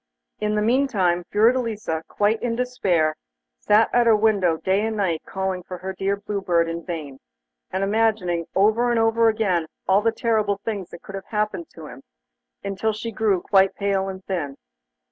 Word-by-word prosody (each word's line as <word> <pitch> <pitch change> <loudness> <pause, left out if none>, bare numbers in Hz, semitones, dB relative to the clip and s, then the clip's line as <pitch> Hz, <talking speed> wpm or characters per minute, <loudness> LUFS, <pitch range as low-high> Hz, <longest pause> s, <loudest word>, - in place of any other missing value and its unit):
In 210 0 0
the 210 - +1
meantime 215 -8 +2
Fiordelisa, 220 -6 +1
quite 210 +2 0
in 235 -1 -1
despair, 190 -11 +1 0.4
sat 215 +2 +4
at 240 -1 +4
her 225 - +6
window 205 -6 +2
day 190 +4 0
and 220 0 -2
night 180 -6 0
calling 190 -1 -2
her 185 +1 -6
dear 195 +1 0
Blue 205 0 -4
Bird 170 -3 +2
in 165 0 -4
vain, 150 -6 -6 0.5
and 190 - -2
imagining 200 -5 +1
over 220 +5 +3
and 235 -1 +2
over 225 0 +3
again 190 -7 0 0.2
all 190 +2 +4
the 225 +1 +2
terrible 220 -3 0
things 205 -5 -3
that 170 - -12
could 195 - -10
have 195 0 -6
happened 215 +9 -2
to - - -10
him, - - -11 0.6
until 200 +2 -1
she 230 +2 -5
grew 210 -4 +1
quite 195 0 +3
pale 195 -1 0
and 190 0 -8
thin. 150 -8 -3
200 Hz, 175 wpm, -23 LUFS, 185-220 Hz, 0.6 s, her